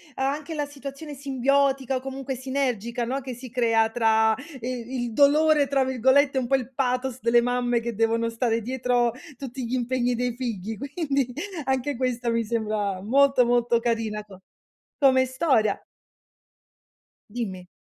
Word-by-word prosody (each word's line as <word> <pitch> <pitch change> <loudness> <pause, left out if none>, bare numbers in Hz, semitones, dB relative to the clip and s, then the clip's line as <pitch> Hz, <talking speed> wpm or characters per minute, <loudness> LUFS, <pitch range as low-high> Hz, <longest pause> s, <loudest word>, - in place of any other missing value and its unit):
anche 285 +4 -2
la 295 -1 -1
situazione 285 +1 -8
simbiotica 275 0 +1
o - - 0
comunque 270 0 -5
sinergica, 245 -3 -2
no, 265 +4 -2
che 255 -1 -6
si 250 +1 -9
crea 230 -2 +2
tra 220 -1 +3 0.3
"i 250 0 -4
il 235 -2 -4
dolore" 295 +2 +4
tra 270 0 +2
virgolette, 265 +2 +3
un 250 -2 0
po' 270 - +3
il 260 0 -3
pathos 255 0 -1
delle 235 +1 +4
mamme 245 0 +1
che 235 -1 -4
devono 230 +1 +1
stare 230 0 0
dietro 245 0 +1 0.3
tutti 260 -2 -6
gli 235 - -4
impegni 245 0 0
dei 245 0 -1
figli 225 -4 -4
quindi 280 - -2 0.3
anche 265 +1 0
questo 250 -1 -1
mi 230 0 +1
sembra 210 -4 -2
molto, 270 +3 +4
molto 240 -1 +2
carina 225 -3 -1
co 195 -3 -14 0.6
come 260 -2 +5
storia. 260 -5 +1 1.5
Dimmi. 195 -6 -5
250 Hz, 150 wpm, -25 LUFS, 230-270 Hz, 1.5 s, come